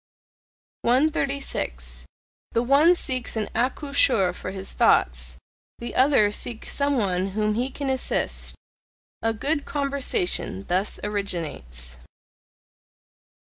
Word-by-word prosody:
136. 245 - 0 0.5
The 230 - +2
one 290 +8 +5
seeks 255 -8 -2
an 215 -2 -2
accoucheur 250 -7 +2
for 185 - -6
his 190 0 -5
thoughts, - - +2 0.4
the 235 0 -6
other 260 -6 +5
seeks 225 +2 -3
some 280 -1 +1
one 190 -4 +1
whom 215 0 +2
he 245 +4 -1
can 280 +1 -5
assist: 265 -1 -1 0.7
a 225 - +2
good 285 +7 -1
conversation 275 - 0
thus 185 +4 0
originates. 155 - -4
225 Hz, 100 wpm, -25 LUFS, 180-275 Hz, 0.7 s, one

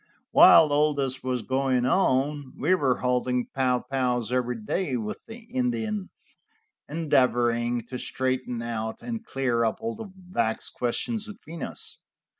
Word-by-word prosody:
While 155 -3 +8
all 150 0 +3
this 135 -2 -2
was 125 -2 -2
going 130 -2 +1
on, 140 -2 +1
we 160 +7 +2
were 140 -8 +2
holding 125 0 +1
pow 125 -2 +1
pows 125 -3 0
every 125 -1 0
day 130 - -1
with 105 -2 -5
the 230 +1 -9
Indians, 230 -6 -3 0.5
endeavoring 120 -6 +1
to 125 0 -6
straighten 130 -2 -2
out 110 -1 -4
and 230 -2 -4
clear 130 - 0
up 110 - 0
all 225 0 -3
the 220 -3 -8
vexed 120 -12 -2
questions 215 - -2
between 170 -6 -9
us. - - -6
130 Hz, 140 wpm, -26 LUFS, 125-170 Hz, 0.5 s, While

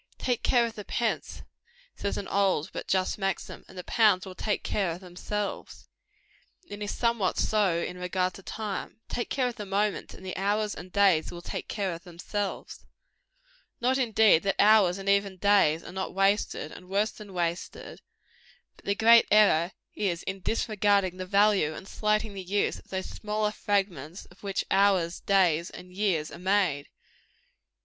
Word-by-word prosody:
"Take 245 -2 -1
care 240 -2 +3
of 230 - -5
the 210 -2 -8
pence," 230 +2 -2 0.5
says 200 - -3
an 200 - -5
old 190 -6 +1
but - - -6
just 190 +2 0
maxim, 195 -2 -3
"and 185 - -14
the 180 - -5
pounds 210 -4 +3
will 190 - -8
take 210 +3 -2
care 195 -4 0
of 165 +1 -4
themselves;" 195 +3 -5 0.8
and 205 0 -8
it - - -2
is 205 - -4
somewhat 230 -6 +1
so 205 -6 +2
in 180 +1 -4
regard 180 0 -1
to - - -11
time. 215 +2 -5
Take 240 - -3
care 260 -2 +1
of 245 -1 -5
the 210 - -5
moments, 200 +1 -1
and 190 - -13
the 185 - -5
hours 205 +2 0
and 180 +1 -10
days 195 -5 +3
will 175 0 -9
take - - -5
care 195 -4 -2
of 165 - -9
themselves. 195 +3 -5 1.0
Not, 255 +2 +1
indeed, 220 -8 +4
that 195 0 0
hours 205 -4 +5
and 195 0 -8
even 200 -1 +2
days 185 -5 +3
are - - -9
not 190 0 -4
wasted, 195 -5 +1
and 180 0 -12
worse 205 +3 +1
than 210 -2 -12
wasted; 175 -1 -4 0.8
but - - -21
the 200 - +1
great 230 +2 +6
error 195 -5 +5 0.2
is, 180 -4 -2
in 190 +1 -4
disregarding 205 -3 +1
the 185 0 -5
value 200 -5 +3
and 190 - -9
slighting 215 0 0
the 195 - -6
use 195 +3 -1
of - - -20
those 190 -1 -3
smaller 210 0 -2
fragments 190 -6 -2
of 180 - -19
which 195 -1 -2
hours, 190 -3 +3
days 175 -4 +2
and 180 0 -12
years 185 -6 0
are - - -9
made. 185 -6 +1
195 Hz, 175 wpm, -28 LUFS, 180-210 Hz, 1.0 s, great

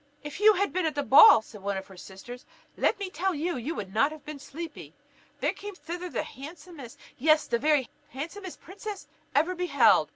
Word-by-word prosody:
"If 295 +4 -7
you 430 +1 +7
had 400 +1 -1
been 365 -2 0
at 310 - -3
the 285 - -1
ball," 275 - +8
said 210 -2 -13
one 200 0 -2
of 190 - -6
her 190 - -15
sisters, 195 +7 -11 0.3
"let - - +1
me 395 -2 -5
tell 370 +3 -1
you, 330 +3 -2
you 265 +7 -4
would 195 -1 -6
not 280 +7 +3
have 310 -2 -11
been 300 -1 -7
sleepy. 320 +4 -9 0.5
There - - +1
came 410 -1 -9
thither 355 0 -6
the - - -2
handsomest, 295 -2 -11 0.2
yes, 310 +3 +4
the 235 - -1
very 295 -2 +2 0.2
handsomest 335 +7 -7
princess 390 -3 -8 0.3
ever 320 +6 +3
beheld! 280 - +3
305 Hz, 200 wpm, -27 LUFS, 255-360 Hz, 0.5 s, ball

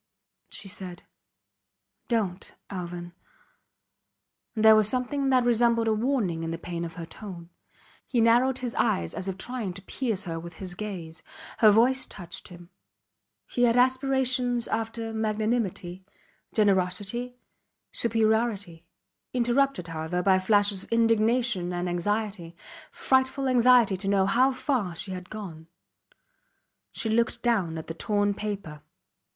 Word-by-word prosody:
She - - -8
said: 185 -2 -6 1.0
Dont 200 -6 -2 0.2
Alvan! 175 -2 -6 1.4
and 220 0 +1
there 220 0 +9
was 215 -1 +5
something 270 +3 0
that 255 -2 +4
resembled 235 -1 +3
a 220 - +3
warning 215 -8 0
in 165 - -3
the 165 - -3
pain 170 0 -5
of 165 -1 -6
her 170 - -6
tone. 175 -2 -10 0.6
He 245 - 0
narrowed 240 +3 +4
his 245 -3 -4
eyes 85 -1 0
as 190 - -5
if 190 -1 -3
trying 230 -3 -3
to 195 - -9
pierce 220 -2 -2
her 165 -3 -4
with 170 +1 -9
his 185 0 -6
gaze. 175 -6 -7 0.4
Her 215 - +7
voice 245 +5 +3
touched 175 -3 -7
him. 175 0 -13 0.7
He 245 - +1
had 235 0 +3
aspirations 255 -1 +2
after 225 0 -3
magnanimity, 215 -4 -2 0.5
generosity, 205 +4 0 0.6
superiority 220 -7 0 0.5
interrupted, 245 -6 +1
however, 165 +2 -2
by 190 -1 +4
flashes 205 0 +2
of - - -16
indignation 230 -4 +2
and 175 0 -2
anxiety 180 -1 -2 0.3
frightful 265 +1 +1
anxiety 245 -5 +5
to 195 +1 -4
know 195 -1 +3
how 250 +7 +3
far 255 - -1
she 190 - -5
had 185 0 -7
gone. 175 -7 -8 1.2
She - - -4
looked 230 +2 0
down 195 -9 +1
at 160 - -6
the 165 - -5
torn 205 +4 0
paper. 200 -7 -5
210 Hz, 135 wpm, -27 LUFS, 180-240 Hz, 1.4 s, there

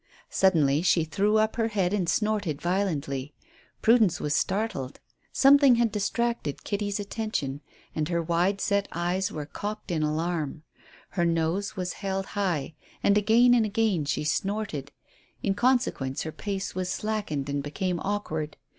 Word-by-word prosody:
Suddenly 155 -6 +3
she 175 -2 +3
threw 200 +7 +1
up 215 +1 +1
her 225 -1 +2
head 200 -4 0
and 185 -5 0
snorted 210 -9 0
violently. 155 -7 -2 0.5
Prudence 225 -6 +4
was 150 - -1
startled. 190 - -1 0.3
Something 275 -2 +6
had 235 -2 +2
distracted 220 - -1
Kitty's 205 0 -2
attention, 200 -10 -3 0.3
and 155 0 -2
her 170 -1 +1
wide 175 +4 +1
set 200 -1 +1
ears 180 +2 0
were 150 -1 -5
cocked 205 +4 -6
in 160 -2 0
alarm. 155 -1 -1 0.5
Her 175 - -1
nose 165 +5 0
was 180 -2 -3
held 195 -1 -2
high, 175 -7 -1 0.3
and 200 - +4
again 225 +4 +5
and 240 -2 +4
again 210 -6 +1
she 140 - -1
snorted. 160 -3 -2 0.5
In 195 - +2
consequence 235 - +1
her 160 - -4
pace 195 +2 -4
was 185 0 -2
slackened 205 -12 -2
and 140 0 -1
became 175 +5 -2
awkward. 160 -7 -3
190 Hz, 145 wpm, -27 LUFS, 155-210 Hz, 0.5 s, Something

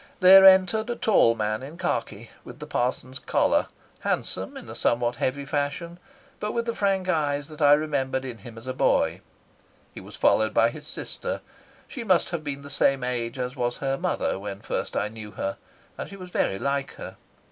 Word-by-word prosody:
There 190 +1 +9
entered 190 +4 +5
a 240 - -1
tall 195 - +4
man 110 0 -1
in 145 +5 -9
khaki, 185 - -3
with - - -11
the - - -8
parson's 130 +1 -2
collar, - - +2 0.3
handsome - - -2
in - - -10
a - - -7
somewhat 120 0 0
heavy 140 +3 -1
fashion, 145 +5 -3 0.4
but 210 - -3
with 235 0 -1
the 230 - -1
frank 195 -3 0
eyes 145 -4 0
that 155 0 -10
I 145 0 +7
remembered 135 -3 0
in 120 -3 -7
him 115 +3 -11
as 115 - -11
a 130 - -3
boy. - - +1 0.7
He - - -9
was - - -8
followed 110 0 +3
by 115 +1 +4
his 150 - -10
sister. - - -5 0.5
She 260 - -6
must 185 -6 +2
have 170 -3 -3
been 140 -1 -5
the 140 - -10
same 135 -1 +2
age 120 0 -2
as 125 0 -3
was 120 -2 -1
her 135 -1 -1
mother 175 - -1
when 100 0 -6
first - - -3
I 105 - 0
knew 105 -1 -9
her, 95 - -3 0.4
and - - -5
she 200 - -9
was 185 -2 -10
very 95 - 0
like 140 +3 -2
her. - - -8
140 Hz, 200 wpm, -25 LUFS, 120-175 Hz, 0.7 s, There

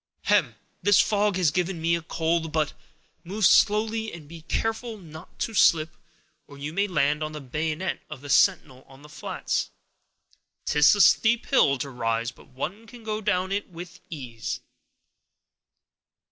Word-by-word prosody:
"Hem—this 205 -1 +1
fog 205 -1 +2
has 180 -5 +2
given 180 +1 -1
me 165 +1 +1
a 170 - 0
cold; 165 0 -1
but 155 -2 0 0.5
move 200 +4 -1
slow—and 215 -6 +2
be 165 +1 -11
careful 225 +6 -3
not 160 -4 -13
to 225 - -3
slip, 160 -5 +3 0.5
or 140 - -13
you 145 +2 -6
may 200 +3 +1
land 150 -4 +1
on 155 0 -3
the 150 - -6
bayonet 155 +6 -3
of 150 -4 -8
the 145 - -10
sentinel 130 -1 +2
on 135 +1 -17
the 150 - -14
flats; 150 - -3 1.0
'tis 150 +6 +5
a 205 - +3
steep 230 +3 +4
hill 140 - +3
to 140 +1 -5
rise, 115 -1 -1
but - - -19
one 180 - -6
can 240 -1 -13
go 215 0 -3
down 190 -3 0
it 200 +1 -2
with 175 -1 -10
ease." 125 -8 -6
165 Hz, 155 wpm, -25 LUFS, 150-205 Hz, 1.0 s, tis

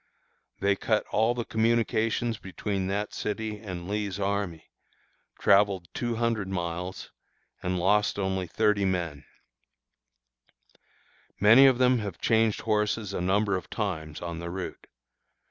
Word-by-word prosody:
They 100 0 +3
cut 110 +2 0
all 110 +3 +2
the 120 -2 -3
communications 115 0 +1
between 95 0 -3
that 100 +2 -2
city 105 0 -3
and 90 -5 -7
Lee's 105 -1 -2
army, 100 -5 -2 0.7
travelled 100 -3 +3
two 120 -1 -2
hundred 115 -3 0
miles, 90 0 -4 0.5
and 90 0 -1
lost 105 +4 +2
only 95 -2 -1
thirty 105 0 +1
men. 85 -7 -2 2.1
Many 115 +7 +8
of 130 -2 +4
them 125 -1 +4
have 100 -5 -5
changed 110 -2 +2
horses 105 -1 0
a 90 - -2
number 100 +2 +2
of 90 - -5
times 80 -7 -4
on 85 -1 -5
the 85 0 -5
route. 95 +1 -6
100 Hz, 130 wpm, -27 LUFS, 95-110 Hz, 2.1 s, Many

